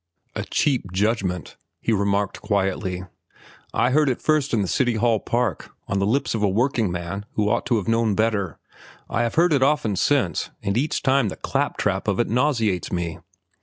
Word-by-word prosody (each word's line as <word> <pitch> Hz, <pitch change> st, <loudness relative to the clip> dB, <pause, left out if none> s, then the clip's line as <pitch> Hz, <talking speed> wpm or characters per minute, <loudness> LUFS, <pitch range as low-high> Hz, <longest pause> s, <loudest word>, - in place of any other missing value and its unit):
"A -, -, -2 dB
cheap 130 Hz, -, 0 dB
judgment," 95 Hz, -3 st, -1 dB, 0.2 s
he 115 Hz, -, 0 dB
remarked 100 Hz, 0 st, 0 dB
quietly. 95 Hz, -2 st, -1 dB, 0.7 s
"I 120 Hz, +4 st, +2 dB
heard 150 Hz, +1 st, +3 dB
it 125 Hz, -, -1 dB
first 155 Hz, -3 st, +1 dB
in 110 Hz, -4 st, +2 dB
the -, -, -2 dB
City 120 Hz, +4 st, +1 dB
Hall 115 Hz, 0 st, +2 dB
Park, 120 Hz, -1 st, -1 dB, 0.2 s
on 95 Hz, -, 0 dB
the 100 Hz, -, +1 dB
lips 135 Hz, +6 st, +1 dB
of 110 Hz, -, -2 dB
a 105 Hz, -, +3 dB
workingman 100 Hz, -5 st, -1 dB
who 105 Hz, -1 st, +1 dB
ought 120 Hz, -, 0 dB
to 120 Hz, -, +2 dB
have 100 Hz, -, -3 dB
known 115 Hz, -2 st, +2 dB
better. 105 Hz, -7 st, 0 dB, 0.5 s
I 115 Hz, -, +1 dB
have 115 Hz, -1 st, -1 dB
heard 170 Hz, 0 st, +4 dB
it 140 Hz, -, +2 dB
often 135 Hz, -7 st, +2 dB
since, 130 Hz, -3 st, +1 dB
and 100 Hz, 0 st, -1 dB
each 145 Hz, +6 st, 0 dB
time 135 Hz, -5 st, +3 dB
the -, -, -6 dB
clap -, -, -2 dB
trap -, -, -1 dB
of -, -, +1 dB
it -, -, +2 dB
nauseates 115 Hz, -, +1 dB
me. 85 Hz, -2 st, -3 dB
110 Hz, 190 wpm, -23 LUFS, 100-125 Hz, 0.7 s, heard